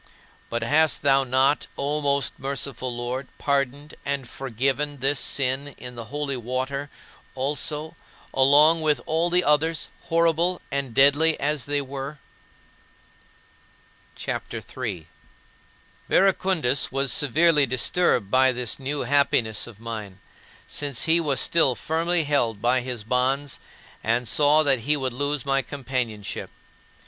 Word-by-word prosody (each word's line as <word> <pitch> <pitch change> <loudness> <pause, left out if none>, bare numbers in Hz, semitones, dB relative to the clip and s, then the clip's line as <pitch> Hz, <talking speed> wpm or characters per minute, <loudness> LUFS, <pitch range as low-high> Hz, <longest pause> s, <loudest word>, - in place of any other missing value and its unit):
But 115 - -2
hast 155 0 +2
thou 135 -1 +4
not, 130 +3 +1
O 145 +2 -1
most 140 -3 0
merciful 135 -2 -3
Lord, 120 +2 -4
pardoned 140 +1 -1
and 140 -3 -3
forgiven 135 +4 -2
this 135 +2 +1
sin 135 +1 0
in 125 0 -8
the 115 -1 -8
holy 140 +1 -3
water 130 +4 -3 0.5
also, 150 +4 -2 0.4
along 150 +5 +5
with 150 -4 +2
all 165 +2 +1
the 180 +1 +3
others, 155 +2 +1 0.2
horrible 170 +2 +2
and 135 -4 -3
deadly 145 +4 +5
as 145 -3 -1
they 145 0 0
were? 135 +2 -7 2.0
CHAPTER - - -5
III 115 -9 -5
5. - - -21 1.0
Verecundus 185 -9 +2
was 135 -1 0
severely 150 +1 +3
disturbed 130 - +1
by 130 0 +5
this 125 -1 -3
new 140 +2 -3
happiness 140 -5 +1
of 110 -3 -13
mine, 110 -5 -7 0.5
since 140 -5 -1
he 165 +1 +4
was 145 -5 0
still 140 -6 +3
firmly 165 +4 0
held 120 -8 0
by 125 +3 +2
his 120 -3 -5
bonds 130 +4 -1 0.4
and 115 +2 0
saw 150 +5 +4
that 135 -4 +2
he 150 +6 +1
would 130 -3 -2
lose 145 +1 -2
my 135 0 +1
companionship. 125 -5 -4
140 Hz, 130 wpm, -24 LUFS, 125-150 Hz, 2.0 s, along